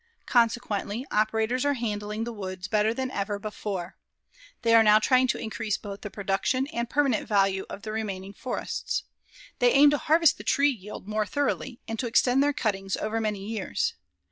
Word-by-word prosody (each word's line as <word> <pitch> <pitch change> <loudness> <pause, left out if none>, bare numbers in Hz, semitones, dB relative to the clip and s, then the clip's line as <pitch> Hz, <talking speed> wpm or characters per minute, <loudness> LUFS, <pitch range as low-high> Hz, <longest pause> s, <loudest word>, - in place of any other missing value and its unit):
Consequently, 230 -1 +1
operators 220 +3 +1
are 285 0 +2
handling 210 -2 -3
the 235 0 -4
woods 185 -3 -6
better 210 +1 +2
than 260 +2 -3
ever 205 -1 -2
before. 200 -3 -5 0.7
They 230 - +3
now 215 -1 +6
are - - +4
trying 255 +3 +3
to - - 0
increase 220 -1 -3
both 200 -1 -8
the 210 - -6
production 200 +7 0
and 235 0 -2
permanent 275 -6 +1
value 195 -2 +2
of 200 - -8
the 215 - -5
remaining 200 -3 -4
forests. 255 +4 -3 0.6
They 245 0 +5
aim 285 +1 +7
to 295 - +1
harvest 325 0 +4
the - - -7
tree 285 +1 +3
yield 210 -4 -9
more 215 0 -1
thoroughly 270 -3 -2
and 225 -1 -4
to 250 - -1
extend 245 +3 +3
their 290 +1 +3
cuttings 195 -9 -1
over 220 +1 -2
many 210 -3 -2
years. 230 - -2
220 Hz, 180 wpm, -27 LUFS, 205-250 Hz, 0.7 s, aim